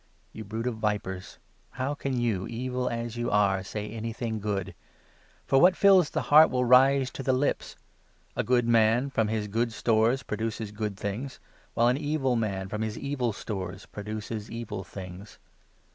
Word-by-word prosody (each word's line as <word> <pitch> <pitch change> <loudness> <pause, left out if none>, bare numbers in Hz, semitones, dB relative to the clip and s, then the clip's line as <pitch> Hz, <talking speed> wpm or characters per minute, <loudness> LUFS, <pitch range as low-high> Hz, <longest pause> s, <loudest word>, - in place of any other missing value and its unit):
You - - -8
34 105 - -10
brood 115 +2 -3
of 115 -3 -3
vipers! 100 -3 -3 0.4
how 130 +3 -2
can 135 -3 -2
you, 110 -6 0
evil 125 +2 -2
as 115 0 -4
you 120 0 -1
are, 100 -2 +2
say 105 +2 -5
anything 115 0 -4
good? 100 -3 -3 0.7
For 135 - +4
what 180 0 +6
fills 190 -6 +5
the - - -2
heart 155 +1 +9
will 125 -1 0
rise 130 +2 +5
to - - -6
the 130 - +1
lips. 135 +3 -1 0.6
A - - 0
good 125 -1 +2
35 120 - +1
man, 115 +4 +4
from 110 -4 +1
his 110 -1 -2
good 115 +3 0
stores, 115 +3 +2
produces 110 -1 -3
good 105 -2 -4
things; 110 +8 -5 0.4
while 120 - +4
an 125 +2 +3
evil 145 -3 0
man, 100 -4 -2
from 105 +2 -4
his 110 0 -3
evil 130 -4 -1
stores, 95 -3 -6
produces 105 +1 -6
evil 110 -4 -5
things. 95 +2 -10
115 Hz, 175 wpm, -27 LUFS, 105-125 Hz, 0.7 s, heart